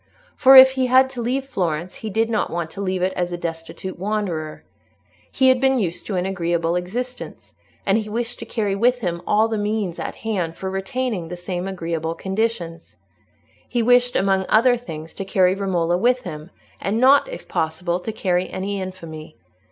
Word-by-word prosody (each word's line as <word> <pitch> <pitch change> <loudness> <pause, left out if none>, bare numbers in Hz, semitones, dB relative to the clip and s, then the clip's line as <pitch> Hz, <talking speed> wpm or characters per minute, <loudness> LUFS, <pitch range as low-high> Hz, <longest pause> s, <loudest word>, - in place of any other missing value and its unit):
For 265 +1 +7
if 265 0 +11
he 260 -1 0
had 260 +1 +5
to 250 -3 -5
leave 260 +3 -1
Florence 180 - -3
he 220 - -6
did 225 +2 +1
not 225 -2 0
want 170 -1 -3
to 200 - -6
leave 185 -2 -1
it 185 +1 +1
as 175 -1 -2
a 175 - -3
destitute 170 +2 -6
wanderer. 185 -6 -3 0.7
He 260 -1 +4
had 255 -1 +3
been 265 0 +3
used 180 -7 -2
to 200 - -2
an 180 0 0
agreeable 170 -3 -1
existence, 245 +9 -5 0.3
and 200 +3 +3
he 215 -1 -6
wished 235 +2 -3
to - - -7
carry 205 -4 -1
with 245 +4 +2
him 170 -4 -2
all 215 +2 +3
the 220 -1 -2
means 205 -4 -2
at - - -4
hand 180 -7 -2
for 190 0 -4
retaining 195 -1 -2
the 175 +2 -7
same 180 +1 -4
agreeable 165 -3 -3
conditions. 190 -5 -3 0.7
He 240 -2 0
wished 245 +1 +4
among 190 -1 +2
other 245 +3 +5
things 165 -10 -8
to 195 - -5
carry 190 -2 +3
Romola 180 -3 0
with 245 +4 +2
him, 155 +2 -7 0.3
and 210 +3 -1
not, 275 - +5
if - - -8
possible, 170 +2 -1
to 220 - -4
carry 185 -4 -1
any 195 +1 -3
infamy. 165 -4 -8
195 Hz, 190 wpm, -22 LUFS, 175-230 Hz, 0.7 s, if